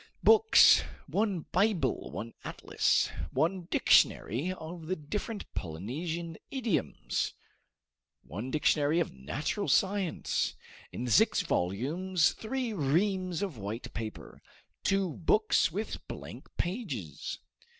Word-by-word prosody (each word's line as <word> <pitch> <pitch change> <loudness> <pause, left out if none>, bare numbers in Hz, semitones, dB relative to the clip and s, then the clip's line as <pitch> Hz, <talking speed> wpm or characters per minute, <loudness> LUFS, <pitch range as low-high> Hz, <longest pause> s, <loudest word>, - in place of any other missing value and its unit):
Books: 445 0 +7 0.3
1 200 -4 0
Bible, 195 - +1
1 115 +2 -6
atlas, - - +1 0.2
1 175 +2 0
dictionary 140 - +3
of 165 -2 -8
the 185 - 0
different 205 +8 -4
Polynesian 155 - -4
idioms, 240 - -1 0.9
1 105 - -6
dictionary 150 +2 +2
of 170 - -1
natural 135 - -3
science, 195 -3 +1 0.4
in 125 - -4
six 120 -5 +4
volumes; 155 - +1
3 240 0 -3
reams 185 +3 +1
of 170 - -4
white 105 +4 -5
paper, 110 -1 -7 0.4
2 195 -4 +1
books 210 0 +3
with 210 +6 -5
blank - - -9
pages. 150 - -3
170 Hz, 100 wpm, -30 LUFS, 130-195 Hz, 0.9 s, Books